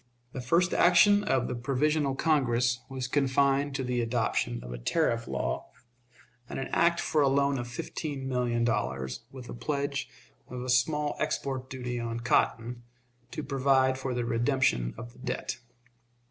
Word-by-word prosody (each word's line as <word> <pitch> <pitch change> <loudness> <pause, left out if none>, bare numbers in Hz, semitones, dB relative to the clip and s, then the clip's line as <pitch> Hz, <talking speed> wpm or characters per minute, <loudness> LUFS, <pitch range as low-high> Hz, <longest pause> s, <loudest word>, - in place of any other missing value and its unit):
The 130 - -5
first 170 +8 +2
action 205 +4 +6
of 130 -11 +1
the - - -3
Provisional 140 +3 0
Congress 125 -6 +2
was 130 -1 -4
confined 140 +1 +2
to 135 - -1
the 125 -1 0
adoption 115 - -1
of 60 0 -7
a - - -6
tariff 115 - 0
law, 60 0 -3 0.8
and - - -5
an 135 - -4
act 170 0 +3
for 155 - +1
a 140 - +4
loan 140 0 +2
of 120 - -4
fifteen 135 +3 -5
million 125 -2 0
dollars, 105 - -2
with 130 -2 -10
a - - -7
pledge 140 +1 -2 0.4
of 125 -1 -6
a 130 - -5
small 145 +4 +2
export 135 -4 -2
duty 125 -2 -4
on 115 0 -3
cotton, 120 0 +1 0.5
to - - -5
provide 135 -1 +2
for 130 -1 -3
the 120 -1 -1
redemption 115 - +1
of 120 +1 -8
the - - -19
debt. 125 -1 -4
130 Hz, 160 wpm, -29 LUFS, 120-140 Hz, 0.8 s, action